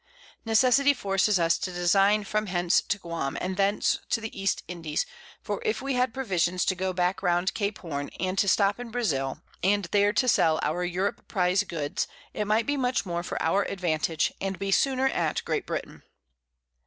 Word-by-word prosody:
Necessity 255 Hz, +5 st, +4 dB
forces 195 Hz, -2 st, +2 dB
us 165 Hz, 0 st, +2 dB
to 185 Hz, -, -3 dB
design 195 Hz, +4 st, +3 dB
from 215 Hz, +1 st, -1 dB
hence 175 Hz, -1 st, +2 dB
to 210 Hz, -, -2 dB
Guam, 170 Hz, -7 st, -4 dB
and 185 Hz, 0 st, -3 dB
thence 200 Hz, +2 st, +1 dB
to 230 Hz, -, +1 dB
the 220 Hz, 0 st, -7 dB
East 195 Hz, -, 0 dB
Indies; 165 Hz, -, -2 dB, 0.4 s
for -, -, -3 dB
if 435 Hz, -2 st, 0 dB
we 275 Hz, 0 st, -2 dB
had 250 Hz, -1 st, +1 dB
Provisions 185 Hz, -8 st, 0 dB
to -, -, +2 dB
go 185 Hz, +1 st, -2 dB
back 180 Hz, +1 st, 0 dB
round 175 Hz, 0 st, +1 dB
Cape 205 Hz, -1 st, -2 dB
Horne, 145 Hz, -5 st, -5 dB
and 185 Hz, 0 st, -1 dB
to 200 Hz, -, +3 dB
stop 200 Hz, +2 st, +3 dB
in 245 Hz, -1 st, -6 dB
Brazil, 150 Hz, -, -2 dB, 0.2 s
and 200 Hz, +1 st, +2 dB
there 205 Hz, 0 st, +4 dB
to 255 Hz, +4 st, +1 dB
sell 160 Hz, -9 st, +3 dB
our 180 Hz, -, 0 dB
Europe 180 Hz, +3 st, -2 dB
Prize 185 Hz, -1 st, +2 dB
Goods, 150 Hz, -6 st, -3 dB, 0.3 s
it 210 Hz, -, -2 dB
might 220 Hz, +2 st, +2 dB
be 285 Hz, 0 st, 0 dB
much 250 Hz, -4 st, 0 dB
more 170 Hz, -2 st, -2 dB
for 175 Hz, -, -4 dB
our 165 Hz, +5 st, +2 dB
Advantage, 165 Hz, -3 st, -1 dB
and 195 Hz, -1 st, -2 dB
be 195 Hz, 0 st, -3 dB
sooner 265 Hz, +5 st, +2 dB
at 170 Hz, -11 st, -1 dB
Great -, -, -2 dB
Britain. -, -, -5 dB
195 Hz, 190 wpm, -27 LUFS, 175-215 Hz, 0.4 s, Necessity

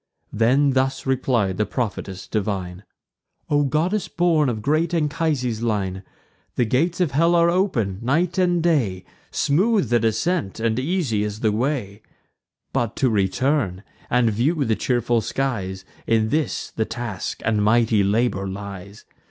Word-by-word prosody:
Then 135 Hz, +6 st, +3 dB
thus 135 Hz, 0 st, 0 dB
replied 125 Hz, -7 st, 0 dB
the 105 Hz, -, +1 dB
prophetess 100 Hz, -6 st, -4 dB
divine: 95 Hz, -3 st, -3 dB, 0.7 s
"O 145 Hz, 0 st, +3 dB
goddess 170 Hz, +8 st, 0 dB
born 165 Hz, -5 st, +2 dB
of 110 Hz, -3 st, -4 dB
great 155 Hz, +5 st, +1 dB
Anchises' 150 Hz, -7 st, -1 dB
line, 100 Hz, -5 st, -1 dB, 0.5 s
The 120 Hz, -, +2 dB
gates 160 Hz, -, 0 dB
of 175 Hz, -6 st, +1 dB
hell 165 Hz, +6 st, +3 dB
are 170 Hz, 0 st, +4 dB
open 120 Hz, -, 0 dB
night 165 Hz, +9 st, +1 dB
and 175 Hz, -2 st, +2 dB
day; 120 Hz, -, +1 dB, 0.2 s
Smooth 195 Hz, +8 st, +1 dB
the 120 Hz, 0 st, +3 dB
descent, 115 Hz, -, -1 dB
and 115 Hz, +1 st, 0 dB
easy 135 Hz, -, 0 dB
is 105 Hz, 0 st, -4 dB
the 110 Hz, -, +2 dB
way: 110 Hz, -3 st, -2 dB, 0.7 s
But 120 Hz, -2 st, -1 dB
to 130 Hz, -3 st, +1 dB
return, 100 Hz, 0 st, 0 dB, 0.3 s
and 120 Hz, -2 st, +3 dB
view 140 Hz, +8 st, +1 dB
the 110 Hz, -1 st, +1 dB
cheerful 120 Hz, -1 st, +1 dB
skies, 100 Hz, -7 st, -3 dB, 0.2 s
In 110 Hz, -1 st, +2 dB
this 155 Hz, +3 st, -1 dB
the 110 Hz, -, -1 dB
task 120 Hz, -6 st, -5 dB
and 105 Hz, -2 st, +1 dB
mighty 110 Hz, -1 st, +3 dB
labour 100 Hz, -1 st, +1 dB
lies. 100 Hz, 0 st, -8 dB
120 Hz, 145 wpm, -22 LUFS, 105-150 Hz, 0.7 s, are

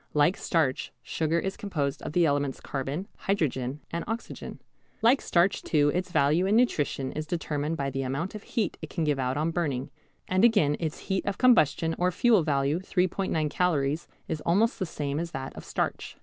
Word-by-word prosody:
Like 150 Hz, +5 st, +4 dB
starch, 155 Hz, -7 st, 0 dB
sugar 160 Hz, +1 st, 0 dB
is 190 Hz, +3 st, -2 dB
composed 150 Hz, -9 st, -2 dB
of -, -, -6 dB
the 175 Hz, 0 st, +4 dB
elements 145 Hz, -2 st, 0 dB
carbon, 140 Hz, +7 st, -4 dB
hydrogen, 145 Hz, -7 st, -1 dB
and 170 Hz, 0 st, -2 dB
oxygen. 225 Hz, +2 st, -5 dB, 0.4 s
Like 250 Hz, +4 st, +5 dB
starch 180 Hz, +3 st, +2 dB
too 145 Hz, -2 st, +2 dB
its 180 Hz, 0 st, -2 dB
value 160 Hz, +4 st, +3 dB
in 205 Hz, -, +3 dB
nutrition 145 Hz, -, +1 dB
is 155 Hz, 0 st, -5 dB
determined 155 Hz, -2 st, -2 dB
by 140 Hz, -1 st, -2 dB
the 135 Hz, +1 st, -2 dB
amount 140 Hz, +8 st, -2 dB
of 215 Hz, -, -7 dB
heat 215 Hz, -4 st, -2 dB
it 155 Hz, -, -6 dB
can 170 Hz, -, -2 dB
give 145 Hz, -3 st, +1 dB
out 130 Hz, +1 st, 0 dB
on 155 Hz, +2 st, 0 dB
burning, 145 Hz, -7 st, -2 dB, 0.4 s
and 185 Hz, +2 st, +2 dB
again 205 Hz, -11 st, +4 dB
its 160 Hz, -3 st, -3 dB
heat 190 Hz, -1 st, -1 dB
of 200 Hz, -, -1 dB
combustion 165 Hz, -, +4 dB
or 180 Hz, +1 st, +3 dB
fuel 220 Hz, +2 st, +4 dB
value 145 Hz, +1 st, +1 dB
3·9 185 Hz, -4 st, 0 dB
calories 155 Hz, -3 st, 0 dB, 0.2 s
is 155 Hz, -, -3 dB
almost 215 Hz, +8 st, +2 dB
the 185 Hz, -, -1 dB
same 145 Hz, -2 st, -3 dB
as 170 Hz, 0 st, -3 dB
that 135 Hz, 0 st, -5 dB
of -, -, -8 dB
starch. -, -, -3 dB
160 Hz, 190 wpm, -28 LUFS, 145-185 Hz, 0.4 s, Like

